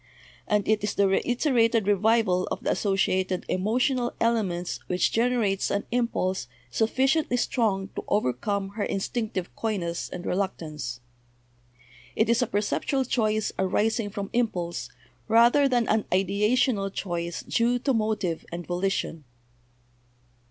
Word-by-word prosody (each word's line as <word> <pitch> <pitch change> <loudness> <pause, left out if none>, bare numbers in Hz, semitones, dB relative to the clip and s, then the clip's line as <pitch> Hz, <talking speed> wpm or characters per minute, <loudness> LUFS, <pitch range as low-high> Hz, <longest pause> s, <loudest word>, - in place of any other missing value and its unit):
And 210 -1 +1
it 215 -1 +2
is 210 - -1
the 200 - +3
reiterated 230 +1 +2
revival 205 -2 +2
of - - -4
the - - +1
associated 190 -2 0
emotional 240 +6 0
elements 195 -7 0
which 180 0 +1
generates 225 -4 +1
an 200 - -1
impulse 190 - 0 0.2
sufficiently 260 - +1
strong 205 -6 0
to - - -6
overcome 200 - 0
her 205 +1 -4
instinctive 195 -2 -3
coyness 185 -7 -2
and 180 - -7
reluctance. 155 -10 -3 1.1
It 220 - +2
is 235 +1 +3
a 245 - +1
perceptual 235 +6 0
choice 215 -3 0
arising 210 +3 +1
from 200 0 -5
impulse 180 -8 -1 0.4
rather 235 +5 +5
than 240 -3 +2
an 215 -1 +1
ideational 200 +3 +2
choice 170 -3 -4
due 240 +1 +1
to 265 +2 0
motive 215 -7 -1
and 170 0 -5
volition." 175 -3 -2
210 Hz, 125 wpm, -26 LUFS, 185-235 Hz, 1.1 s, rather